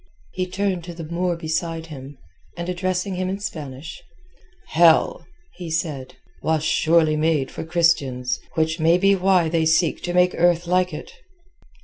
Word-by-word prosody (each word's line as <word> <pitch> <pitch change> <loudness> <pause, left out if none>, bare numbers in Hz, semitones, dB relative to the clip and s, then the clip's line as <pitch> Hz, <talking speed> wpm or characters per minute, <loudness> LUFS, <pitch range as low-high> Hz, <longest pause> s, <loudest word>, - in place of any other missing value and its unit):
He 185 0 -3
turned 185 -1 -2
to 175 -1 -8
the 165 - -7
Moor 170 +2 -1
beside 165 0 -3
him, 140 -3 -10 0.4
and 170 0 -4
addressing 185 +1 -2
him 185 0 -1
in 195 - -2
Spanish— 150 -6 -7 0.7
"Hell," 165 0 +4 0.3
he 175 -2 -7
said, 155 -5 -3 0.3
"was 160 -1 0
surely 160 0 +3
made 155 -3 0
for - - -6
Christians, 160 -7 +1 0.2
which 160 +1 0
may 165 +2 +4
be 195 +2 +4
why 185 -3 +3
they 160 0 +1
seek 160 0 +2
to 175 - -3
make 180 0 +4
earth 175 0 +2
like 180 +1 +1
it." 150 - -8
165 Hz, 155 wpm, -22 LUFS, 160-180 Hz, 0.7 s, Hell